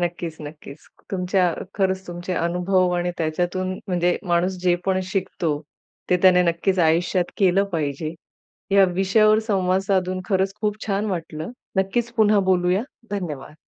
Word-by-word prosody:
नक्कीच, 175 -2 -3
नक्कीच. 150 -1 -11 0.2
तुमच्या 180 -1 +1 0.2
खरंच 190 -1 0
तुमचे 175 +1 -5
अनुभव 180 +2 +1
आणि 175 0 0
त्याच्यातून 175 +4 -1 0.2
म्हणजे 175 -1 +1
माणूस 175 +2 +1
जे 180 -1 +4
पण 190 -1 +1
शिकतो, 165 -6 -1 0.5
ते 180 - +5
त्याने 180 -1 +6
नक्कीच 175 +2 0
आयुष्यात 175 +2 +2
केलं 195 0 +3
पाहिजे. 155 0 -2 0.6
या 195 0 +6
विषयावर 215 +3 +4
संवाद 185 -2 +2
साधून 185 -1 +1
खरंच 190 -1 +1
खूप 210 -1 0
छान 200 +1 0
वाटलं. 165 -2 -4 0.3
नक्कीच, 230 +5 0
पुन्हा 215 -2 +4
बोलूया, 180 +3 +2 0.3
धन्यवाद! 155 -8 -5
180 Hz, 135 wpm, -23 LUFS, 170-195 Hz, 0.6 s, त्याने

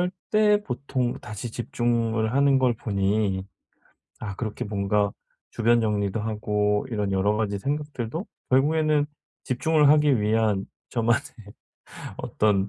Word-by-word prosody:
그럴 180 0 +1 0.2
때 210 -1 +4
보통 125 -4 -2
다시 105 +3 -6
집중을 115 -1 0
하는 140 0 +4
걸 125 -2 +2
보니 100 -2 0 0.8
아 100 -3 -5
그렇게 110 -2 -4
뭔가 100 0 0 0.4
주변 120 0 +3
정리도 105 -1 0
하고 105 -1 0
이런 105 -4 -1
여러 95 +2 +2
가지 100 -2 -1
생각들도 145 - -3 0.2
결국에는 150 +2 +3 0.4
집중을 150 +4 +2
하기 150 -4 +5
위한 105 -2 +1 0.2
저만의 120 0 +2 1.0
어떤 100 -2 +1
115 Hz, 255 characters per minute, -25 LUFS, 105-135 Hz, 1.0 s, 하기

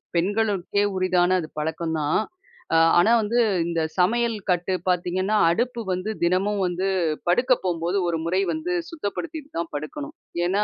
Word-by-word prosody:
பெண்களுக்கே 200 +1 +1
உரித்தான 185 -1 +2
அது 155 - -6
பழக்கம் 160 +1 -2
தான். 150 0 +1 0.8
ஆனா, 175 +6 +5
வந்து 225 +3 0 0.3
இந்த 170 -1 -1 0.2
சமையல் 230 +5 +2 0.2
கட்டு 180 +1 0 0.2
பாத்தீங்கன்னா, 180 +3 0
அடுப்பு 240 +7 0
வந்து 185 +4 -3
தினமும் 195 +4 +1
வந்து 180 +2 -2 0.4
படுக்க 245 +9 +2
போகும்போது 175 +1 -1
ஒரு 170 -1 0
முறை 185 +3 +1
வந்து 315 +3 -3 0.2
சுத்தப்படுத்திட்டு 310 +2 -5
தான் 170 -1 -3
படுக்கணும். 290 - -6 0.3
ஏனா, 195 +4 +1
185 Hz, 135 wpm, -24 LUFS, 175-220 Hz, 0.8 s, ஆனா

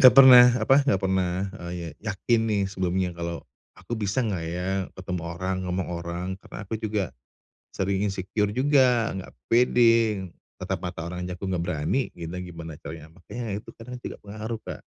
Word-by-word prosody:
enggak 130 - +10
pernah 130 -2 +11
apa, 125 +3 +4
enggak 95 -8 +3
pernah, 95 -2 +1 0.4
eee, - - -5 0.3
ya 110 - -5
yakin 115 +4 +2
nih 105 -2 +2
sebelumnya 95 -1 0
kalau, 85 0 -5 0.3
aku - - -10
bisa 100 +4 0
enggak 95 -7 -2
ya 90 +2 -3 0.3
ketemu 90 -1 -4
orang, 95 +2 -2
ngomong 90 +1 -1
orang, 85 +1 -4
karena - - -11
aku 110 +3 -3
juga 105 - -1 0.6
sering 95 +1 0
insecure 100 +1 -1
juga, 125 -3 +3
enggak 95 - -7 0.2
pede, 115 -4 +4 0.3
tatap - - -3
mata 80 +1 -4
orang 90 +1 -5
aja 90 0 -5
aku 95 - -4
enggak 90 -2 -1
berani, 85 - -1
gitu 85 +1 -5
gimana 85 -3 -8
caranya 80 -1 -8
makanya 115 +3 -5
itu - - -11
kadang 125 +2 -8
juga - - -6
pengaruh, 110 +2 -6
Kak. - - -6
95 Hz, 175 wpm, -26 LUFS, 90-115 Hz, 0.6 s, pernah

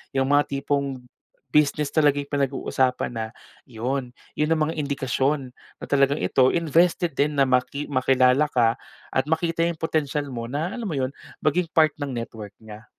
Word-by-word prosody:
yung 135 0 +1
mga 145 0 +4
tipong 140 -2 -2 0.5
business 150 0 +2
talaga 145 -2 +3
yung 140 - -11
pinag-uusapan 135 -2 0
na, 110 -2 -4 0.4
yun. 125 +2 -3 0.2
Yun 150 +1 +1
ang 155 - -1
mga - - -4
indikasyon 135 -1 -1 0.3
na - - -5
talagang 140 +1 +2
ito, 130 -1 +3
invested 170 +1 +2
din 150 +1 +2
na 140 - +4
maki 130 +3 0
makilala 130 +1 +3
ka 115 -5 +2 0.3
at 130 - +1
makita 165 +1 0
yung 170 -2 -4
potensial 150 -3 -1
mo, 115 -2 -4
na 155 +8 -2
alam 235 - -4
mo 165 - -3
yun, 130 -1 0 0.3
maging 170 +4 +2
part 160 -2 +6
ng 140 -2 -3
network 110 -4 -6
niya. 110 0 -11
140 Hz, 165 wpm, -24 LUFS, 130-150 Hz, 0.5 s, part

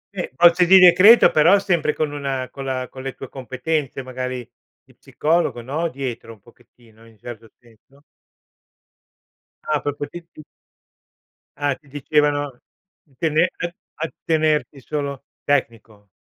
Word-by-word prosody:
Eh, 180 - -4
bozze 175 +2 +5
di 190 +1 +8
decreto, 185 +5 +7
però 165 +6 +5
sempre 175 -6 0
con 155 -2 -2
una 135 -3 -4
con 135 -1 -8
la 130 -1 -3
con 130 - -11
le 135 0 -6
tue 135 - -9
competenze, 135 +1 -4
magari, 125 -1 -5 0.4
di - - -24
psicologo, 160 -6 -1
no, 155 +7 -2
dietro 125 -4 -6
un 110 - -19
pochettino, 115 0 -22
in 110 -1 -21
certo 115 0 -11
senso. 120 +4 -25 1.7
Ah, 150 -1 +1
proprio 145 0 -4
ti 175 - -7
ti 155 - -13 1.1
Ah, 145 -2 -1
ti 145 - -26
dicevano, 145 -1 -1 0.4
di 140 -5 -31
tene 165 +1 +2
a 175 -1 -4 0.2
attenerti 155 -3 -1
solo 140 -1 -5 0.2
tecnico. 115 -7 -2
140 Hz, 135 wpm, -21 LUFS, 125-155 Hz, 1.7 s, di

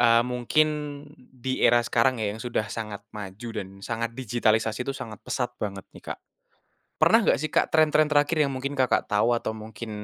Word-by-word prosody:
eee, 115 -1 +6
mungkin 125 +5 +2 0.5
di 130 0 -5
era 120 - +6
sekarang 120 +1 +2
ya, 105 -2 0
yang 110 - -9
sudah 120 -3 -1
sangat 105 -3 -6
maju 105 +2 -7
dan 100 -3 -4 0.2
sangat 115 0 -2
digitalisasi 110 -2 +1
itu 135 - -1
sangat 110 -5 -7
pesat 125 -1 -2
banget 100 -2 -4
nih - - -13
Kak, - - -25 0.8
pernah - - +6
enggak - - +3
sih, 155 - -2
Kak, - - +3
trend-trend 155 -1 +4
terakhir 145 +2 +3
yang 140 - -3
mungkin 135 +2 -3
Kakak 130 -2 +2
tahu 105 +3 +3
atau 115 - -3
mungkin 110 +1 -8
120 Hz, 185 wpm, -26 LUFS, 110-130 Hz, 0.8 s, eee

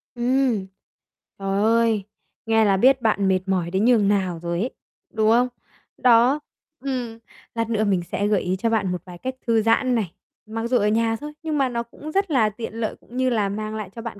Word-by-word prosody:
Ừm. 245 -4 +1 0.7
Trời 195 0 -1
ơi, 225 -2 +3 0.4
nghe 225 -1 +3
là 195 -1 +3
biết 260 +5 +4
bạn 205 -3 +2
mệt 190 -1 +3
mỏi 180 -3 0
đến 190 +4 +1
nhường 230 -5 +4
nào 190 -4 0
rồi 170 0 -3
ấy, 250 +4 -2 0.4
đúng 220 0 +2
không? 245 +2 +4 0.5
Đó, 245 +3 +5 0.4
ừm, 245 -4 -3 0.4
lát 230 -1 -1
nữa 220 -2 +1
mình 195 -4 +1
sẽ 205 - 0
gợi 205 -2 +2
ý 180 +1 -1
cho 230 - +1
bạn 210 -5 +1
một 180 -2 -3
vài 180 -1 -10
cách 260 +7 -5
thư 225 -1 +3
giãn 235 +3 +2
này, 205 -7 -1 0.4
mặc 225 +1 -3
dù 250 - +3
ở 210 -2 +2
nhà 225 +1 +2
thôi, 295 +5 -8
nhưng 310 -2 -1
mà 270 -2 +2
nó 235 -1 -2
cũng 290 +6 -10
rất 390 -1 0
là 225 -6 +3
tiện 220 +1 -7
lợi, 225 -1 -3
cũng 245 - -11
như 260 0 +2
là 215 -4 +1
mang 215 +2 -4
lại 215 -3 -5
cho 230 - -6
bạn 225 -3 -7
225 Hz, 220 wpm, -23 LUFS, 200-245 Hz, 0.7 s, Đó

